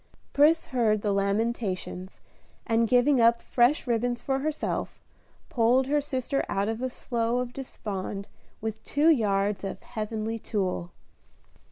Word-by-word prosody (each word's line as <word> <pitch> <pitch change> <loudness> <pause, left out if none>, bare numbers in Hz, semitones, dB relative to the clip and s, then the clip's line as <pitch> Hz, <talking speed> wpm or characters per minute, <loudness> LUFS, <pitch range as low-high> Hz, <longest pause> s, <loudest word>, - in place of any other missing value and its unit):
Pris 310 +3 +4
heard 215 -4 +2
the 205 - +1
lamentations, 200 -2 -2 0.4
and 230 0 +2
giving 250 +2 +4
up 235 0 +5
fresh 245 +5 +2
ribbons 240 0 0
for 270 0 -1
herself, 305 +2 -3 0.5
pulled 245 +2 +3
her 295 +2 +1
sister 275 -1 -2
out 200 +1 0
of 225 +2 -3
a 255 - -1
slough 235 -1 -1
of 250 -1 -4
despond 200 -6 -5 0.3
with 220 0 -4
two 295 +3 +3
yards 205 -6 +1
of 195 - -5
"heavenly 220 +1 -4
tulle." 185 -5 -2
230 Hz, 135 wpm, -27 LUFS, 210-255 Hz, 0.5 s, up